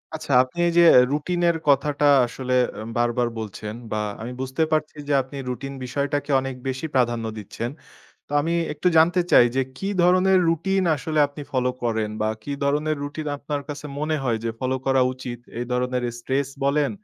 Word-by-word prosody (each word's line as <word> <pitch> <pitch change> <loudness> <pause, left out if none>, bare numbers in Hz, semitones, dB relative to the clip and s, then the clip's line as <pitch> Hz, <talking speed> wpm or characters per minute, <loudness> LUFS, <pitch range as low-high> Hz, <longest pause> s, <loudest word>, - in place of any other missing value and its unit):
আচ্ছা। 155 -3 -3
আপনি 130 +7 -10
এই - - +2
যে, - - +8 0.3
রুটিন 175 +5 -1
এর 170 - +1
কথাটা 145 +1 +2 0.2
আসলে 125 +2 -4 0.2
অ্যা 105 - -7
বারবার 120 0 +1
বলছেন, 105 0 -6 0.2
বা 110 - -1 0.2
আমি 115 +2 -5
বুঝতে 130 +4 -1
পারছি 155 -1 0
যে 145 - +1
আপনি 135 +2 -9
রুটিন 135 +2 -5
বিষয়টাকে 145 +3 -2
অনেক 135 -1 -5
বেশি 130 +3 -3
প্রাধান্য 120 -3 +1
দিচ্ছেন। 110 +3 -5 0.6
তো - - -10
আমি 165 +3 -1 0.2
একটু 150 +4 +1
জানতে 170 +3 +5
চাই। - - +8
যে, 135 - +3 0.2
কি 195 - -3
ধরনের 185 +2 +4
রুটিন 190 +4 +1
আসলে 155 +2 -3
আপনি 145 +1 -9
ফলো 125 -1 +1
করেন 110 -3 -1
বা 110 - +1
কি 145 - -5
ধরণের 150 +2 +1
রুটিন 150 +2 -6
আপনার 145 0 -4
কাছে 150 0 -6
মনে 155 +1 0
হয় 120 -4 +1
যে 115 - 0
ফলো 130 0 0
করা 135 -1 +4
উচিত? 125 -1 -7 0.2
এই 120 - -2
ধরনের 125 0 0 0.2
স্ট্রেস 135 +3 -1 0.2
বলেন 145 +1 +2
140 Hz, 185 wpm, -23 LUFS, 125-155 Hz, 0.6 s, যে